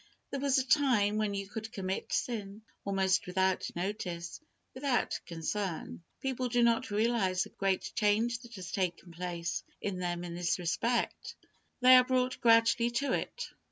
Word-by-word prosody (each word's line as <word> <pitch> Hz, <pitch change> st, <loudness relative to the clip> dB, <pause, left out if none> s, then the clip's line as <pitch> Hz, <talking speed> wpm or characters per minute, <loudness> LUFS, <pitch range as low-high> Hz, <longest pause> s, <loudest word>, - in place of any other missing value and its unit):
There 275 Hz, -, -2 dB
was 275 Hz, -1 st, +2 dB
a 260 Hz, -, +2 dB
time 245 Hz, -7 st, +3 dB
when 210 Hz, -2 st, 0 dB
you 195 Hz, 0 st, -3 dB
could 220 Hz, +1 st, -6 dB
commit 190 Hz, -3 st, -3 dB
sin, 210 Hz, -3 st, -2 dB, 0.2 s
almost 195 Hz, -2 st, +1 dB
without 190 Hz, 0 st, +1 dB
notice, 175 Hz, -, -4 dB, 0.3 s
without 260 Hz, -1 st, 0 dB
concern. 175 Hz, +1 st, -3 dB, 0.2 s
People 255 Hz, -2 st, -1 dB
do 240 Hz, 0 st, +3 dB
not 235 Hz, +2 st, +2 dB
realize 205 Hz, -4 st, +1 dB
the -, -, -10 dB
great 195 Hz, -1 st, -1 dB
change 225 Hz, +3 st, +2 dB
that 235 Hz, -1 st, -12 dB
has 180 Hz, -4 st, -7 dB
taken 180 Hz, -2 st, -2 dB
place 170 Hz, 0 st, -3 dB, 0.2 s
in 195 Hz, -3 st, -3 dB
them 175 Hz, -1 st, -2 dB
in 175 Hz, -1 st, -6 dB
this 175 Hz, 0 st, 0 dB
respect. 230 Hz, +7 st, -1 dB, 0.5 s
They 255 Hz, +1 st, +9 dB
are 250 Hz, -, +7 dB
brought 255 Hz, 0 st, 0 dB
gradually 230 Hz, 0 st, +5 dB
to 255 Hz, +2 st, 0 dB
it. -, -, -3 dB
210 Hz, 155 wpm, -31 LUFS, 185-240 Hz, 0.5 s, They